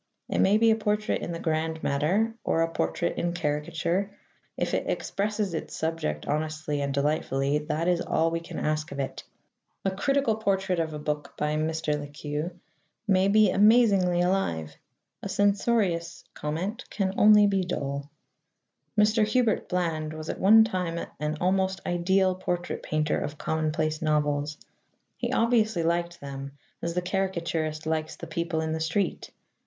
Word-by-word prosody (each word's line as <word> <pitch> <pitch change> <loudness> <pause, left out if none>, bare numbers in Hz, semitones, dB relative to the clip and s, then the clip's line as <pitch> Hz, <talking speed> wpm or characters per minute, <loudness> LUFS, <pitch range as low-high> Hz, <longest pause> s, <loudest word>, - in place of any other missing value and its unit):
It - - 0
may 200 +2 +5
be 225 0 +5
a - - +4
portrait 210 -1 0
in - - -4
the 170 - -3
grand 160 0 -2
matter, 180 +11 +1
or 165 - +2
a 165 - -2
portrait 80 0 -1
in 170 0 -1
caricature: 170 +5 -1 0.5
if - - -1
it - - -1
expresses 205 -2 -1
its 160 - -4
subject 160 - -2
honestly 155 -1 -2
and 140 0 -1
delightfully, 140 0 0
that 155 +2 -2
is 175 -1 +2
all 165 +1 +1
we 165 - -1
can 165 - -9
ask 155 0 -1
of 140 - -6
it. 135 - -4 0.6
A 195 - +2
critical 225 +3 +1
portrait 195 -4 0
of 160 -2 -2
a - - -3
book 150 0 -4
by 150 0 0
Mr. 155 -1 -1
Le 145 - -6
Queux 150 +2 -4 0.6
may 190 -1 +4
be 210 -1 +5
amazingly 200 -4 +5
alive: 85 - 0 0.5
a 200 - -5
censorious 200 -3 +1
comment 180 +11 -3
can 190 -2 -1
only 210 0 +7
be 195 -1 +2
dull. 140 -5 -3 0.9
Mr. 215 +1 +4
Hubert 220 0 +1
Bland 165 -4 -1
was 155 0 -7
at - - -4
one 220 +3 +7
time 180 -6 -2 0.2
an 150 +1 -2
almost 190 +1 +1
ideal 185 +2 +2
portrait 180 -1 -3
painter 155 -1 0
of 145 - -4
commonplace 155 0 -1
novels. 150 -1 0 0.6
He - - -2
obviously 220 -6 +2
liked 170 +1 -1
them, 140 0 -7 0.3
as 170 0 -3
the 180 - 0
caricaturist 170 -5 -2
likes 160 0 -1
the - - -8
people 170 0 -2
in 160 0 -2
the 160 - -1
street. 165 +4 -1
170 Hz, 160 wpm, -27 LUFS, 155-195 Hz, 0.9 s, only